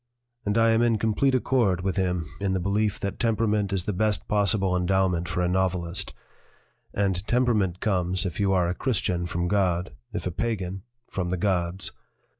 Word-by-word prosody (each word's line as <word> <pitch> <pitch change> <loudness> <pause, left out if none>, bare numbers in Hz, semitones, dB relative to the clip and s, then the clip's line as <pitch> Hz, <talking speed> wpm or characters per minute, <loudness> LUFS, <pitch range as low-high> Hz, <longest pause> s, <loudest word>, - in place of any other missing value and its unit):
And 105 +2 +1
I 115 0 +5
am 115 +1 +3
in 120 -2 +3
complete 115 +5 +2
accord 115 -8 +2
with 95 0 -1
him 90 -4 0
in 100 -1 0
the 95 - 0
belief 100 +3 0
that 100 -1 -3
temperament 110 -3 +1
is 95 -2 0
the 105 - -1
best 105 +2 0
possible 100 -2 +2
endowment 90 -1 +1
for 85 +2 -1
a - - +2
novelist 90 -1 -1 0.8
and 95 -3 0
temperament 110 -8 +1
comes, 90 -3 0
if 90 - -4
you 100 -1 +2
are 90 -2 +3
a 85 - 0
Christian, 90 -6 -1
from 85 +1 -1
God; 90 -3 +1 0.2
if - - -4
a 90 - -1
pagan, 95 -2 -2 0.3
from 90 -2 -3
the 90 - -1
gods." 90 -1 -1
95 Hz, 180 wpm, -26 LUFS, 90-105 Hz, 0.8 s, I